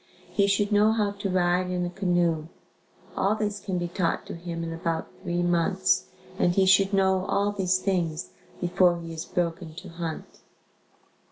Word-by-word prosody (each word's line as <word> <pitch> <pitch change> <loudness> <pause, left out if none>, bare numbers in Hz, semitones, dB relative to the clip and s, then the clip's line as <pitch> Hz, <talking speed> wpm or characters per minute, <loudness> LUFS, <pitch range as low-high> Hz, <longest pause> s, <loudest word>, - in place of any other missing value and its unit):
He 200 -2 +2
should 200 +1 +1
know 210 +1 +5
how 210 -2 +1
to 200 0 -4
ride 180 0 +2
in 180 -1 -1
a - - -2
canoe. 175 -4 +1 0.7
All 200 +2 +2
this 210 -1 -2
can 190 -2 -3
be 175 0 -1
taught 170 -1 -1
to - - -7
him 170 0 -5
in 165 0 -4
about 165 0 -2
3 175 0 -1
months 175 +2 +2 0.3
and 175 - +3
he 195 - +4
should 190 +1 +5
know 190 -1 +2
all 200 +1 +1
these 185 -2 +1
things 180 -4 -1 0.3
before 175 0 +3
he 165 -1 -7
is 160 - -5
broken 170 -2 -3
to 185 +1 -9
hunt. 165 -1 -6
180 Hz, 175 wpm, -26 LUFS, 170-195 Hz, 0.7 s, know